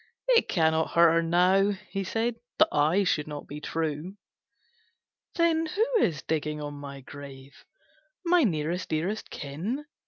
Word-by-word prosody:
'It 475 -2 +4
cannot 160 -1 +2
hurt 170 -1 +6
her 165 0 +3
now,' 180 +4 +3 0.2
he 195 -1 -2
said, 225 +5 -1 0.2
'That 315 +2 +5
I 160 +7 +3
should 155 -5 0
not 150 -1 -6
be 150 +1 -8
true.'" 160 +5 -3 1.2
"Then 330 -1 +2
who 415 +8 +1 0.2
is 155 - -1
digging 155 -1 -2
on 145 -1 -5
my 140 -1 -8
grave, 140 0 -12 0.6
My 350 -1 +4
nearest 170 - -1
dearest 175 +7 -2
kin?" 180 - -4
165 Hz, 145 wpm, -27 LUFS, 150-205 Hz, 1.2 s, hurt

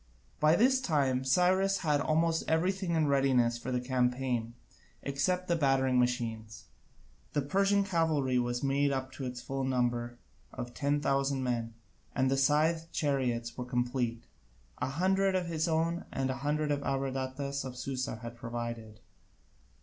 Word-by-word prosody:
By 155 +2 +5
this 260 +5 +4
time 140 - +1
Cyrus 185 +7 +3
had 145 -2 +2
almost 160 +2 +1
everything 180 +2 +1
in 160 -1 +3
readiness 130 -4 +2
for 130 - -5
the 125 - +1
campaign, 125 -2 -1 0.5
except 180 +7 -1
the 170 - +2
battering 135 -4 +2
machines. 115 -3 -2 0.7
The 145 - +1
Persian 195 +6 +2
cavalry 160 -9 +1
was 120 +1 -1
made 140 +1 +2
up 130 -1 -3
to 135 - -6
its 125 -1 -5
full 135 0 -3
number 120 -2 -1 0.3
of 120 -1 -6
ten 145 +1 0
thousand 135 -1 +1
men, 115 -2 -2 0.4
and 130 0 +2
the 135 - +2
scythed 160 +4 +2
chariots 125 -5 -1
were 125 - -4
complete, 125 -1 -1 0.6
a - - -1
hundred 190 +5 +2
of 185 -1 0
his 160 -1 -1
own, 165 +1 0
and 135 0 -1
a 130 - -4
hundred 150 +3 -1
that 145 -1 0
Abradatas 135 0 -2
of 125 -1 -7
Susa 130 -1 -3
had 115 0 -6
provided. 115 -2 -6
135 Hz, 150 wpm, -31 LUFS, 125-160 Hz, 0.7 s, By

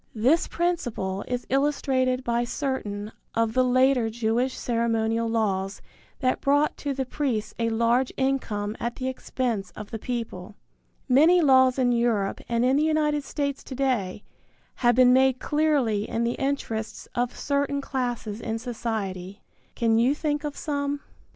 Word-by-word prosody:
This 260 +10 +3
principle 240 - -2
is 245 0 -3
illustrated 265 -2 +1
by 235 -1 +1
certain 235 -5 -3 0.2
of 230 -1 +1
the 255 - +4
later 255 -1 +3
Jewish 235 +3 0
ceremonial 230 -1 0
laws 200 -3 -1 0.4
that 255 -1 +1
brought 290 +2 +2
to 285 - -3
the 265 0 -1
priests 240 -6 -2
a 230 0 +1
large 235 +3 +2
income 225 -6 -1
at 235 0 -3
the 260 - -4
expense 245 -6 -2
of 210 -1 -8
the 225 - -4
people. 215 -5 -5 0.5
Many 310 +7 +6
laws 260 -4 +5
in 250 -2 +3
Europe 235 -5 +1
and 235 +1 +2
in 260 +2 +3
the 300 - +3
United 305 -2 +1
States 280 -1 -3
to 265 - -8
day 235 -8 -1 0.5
have 240 -2 +3
been 250 0 +6
made 260 0 +4
clearly 280 -9 +1
in 230 - -1
the 235 - +1
interests 240 -6 -3
of 245 0 -1
certain 280 0 0
classes 245 -5 -3
in 225 0 -2
society. 215 -5 -4 0.3
Can 225 -1 +2
you 255 +5 +3
think 295 -1 -1
of 295 -1 -4
some? 285 -2 -1
III. 285 - -10
245 Hz, 155 wpm, -26 LUFS, 225-275 Hz, 0.5 s, Many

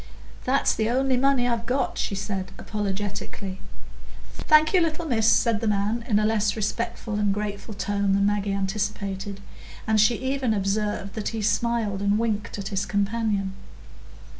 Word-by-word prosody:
"That's 270 +2 +3
the 220 0 0
only 260 +2 +2
money 260 -1 +3
I've 235 -1 -1
got," 255 +1 0
she 200 - -1
said 190 -1 -4
apologetically. 200 -1 -4 0.7
"Thank 310 +2 +4
you, 370 - +5
little 330 0 -1
miss," 225 -6 +3
said 225 0 +3
the 225 - 0
man, 210 +3 0
in 210 - +3
a 210 - +2
less 215 -1 +1
respectful 215 0 -2
and 205 -1 +2
grateful 205 +1 -4
tone 200 0 0
than 200 0 +3
Maggie 205 0 +1
anticipated, 195 0 -3 0.4
and 220 -1 +3
she 235 +3 +4
even 260 -2 0
observed 200 0 -1
that 215 - -4
he 225 -1 -2
smiled 220 -3 0
and 200 +1 +2
winked 215 -3 -1
at 195 -1 -4
his 195 -1 -1
companion. 205 -1 0
210 Hz, 160 wpm, -25 LUFS, 200-230 Hz, 0.7 s, you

